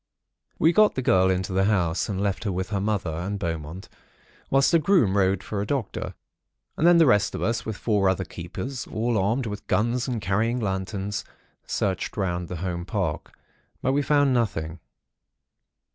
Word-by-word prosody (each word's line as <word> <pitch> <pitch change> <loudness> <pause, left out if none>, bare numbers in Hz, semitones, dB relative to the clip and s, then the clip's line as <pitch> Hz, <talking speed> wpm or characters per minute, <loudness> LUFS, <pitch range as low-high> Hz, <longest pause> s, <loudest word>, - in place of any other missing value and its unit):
"We 165 +2 +4
got 215 +1 +5
the 130 - -2
girl 95 -7 +4
into 95 0 -1
the 95 +1 +2
house, 95 -5 +1
and 95 -2 -2
left 100 -1 -1
her 100 - 0
with 95 +2 -3
her 100 -3 -1
mother 100 -5 -1
and 90 +6 -3
Beaumont, 85 -1 -5 0.6
whilst 135 +4 +3
a 170 - +6
groom 155 - +3
rode 95 -1 +2
for 100 -2 -3
a - - -2
doctor. 135 -5 -3 0.6
And 165 - +2
then 175 0 +7
the 165 - +6
rest 105 -7 +3
of - - -3
us, 115 0 -1
with 110 -3 -3
four 105 -4 +2
other 95 0 -1
keepers, 120 +9 -6
all 115 +2 -1
armed 110 +6 +1
with 105 -2 -6
guns 120 +4 +1
and 125 -3 -2
carrying 110 +5 0
lanterns, 100 -1 -3 0.4
searched 95 +1 -2
round 90 -3 -1
the 90 - -5
home 85 -1 -3
park. 95 -5 -3 0.5
But 130 - +2
we 145 - +2
found 145 -2 +3
nothing. 85 -9 -1
100 Hz, 180 wpm, -25 LUFS, 95-120 Hz, 0.6 s, then